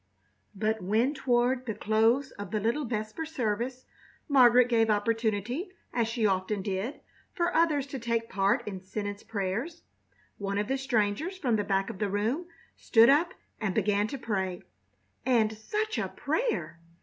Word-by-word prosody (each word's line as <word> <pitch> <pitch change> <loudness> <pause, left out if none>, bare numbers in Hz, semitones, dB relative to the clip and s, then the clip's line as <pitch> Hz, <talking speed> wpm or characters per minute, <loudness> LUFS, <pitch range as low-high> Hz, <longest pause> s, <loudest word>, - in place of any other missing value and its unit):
But 215 +2 0
when 220 +9 +2
toward 250 -1 +1
the 220 - -2
close 225 +6 +2
of 205 -2 -8
the 215 - -1
little 235 +8 0
vesper 215 +5 -3
service 250 -4 -2 0.4
Margaret 250 -4 +6
gave 225 -2 +3
opportunity, 225 - 0 0.2
as 235 -2 +1
she 230 -1 -1
often 190 0 0
did, 195 +7 -3 0.3
for 345 0 0
others 310 -4 +3
to 270 - -3
take 230 -1 -1
part 200 +4 +1
in 190 -3 -5
sentence 205 +1 -5
prayers, 225 - -3 0.6
one 200 0 -2
of 205 0 0
the 270 +2 -1
strangers 265 - 0
from 250 -10 +1
the 210 - +1
back 195 +1 0
of 195 - -11
the 210 - 0
room 225 - -1 0.3
stood 230 0 +5
up 330 +5 +2 0.2
and 205 -4 -2
began 210 0 +2
to 275 - -5
pray. 190 -7 -2 0.6
And 225 -4 +3
such 425 - -2
a - - -1
prayer! 460 - -2
225 Hz, 160 wpm, -29 LUFS, 205-260 Hz, 0.6 s, Margaret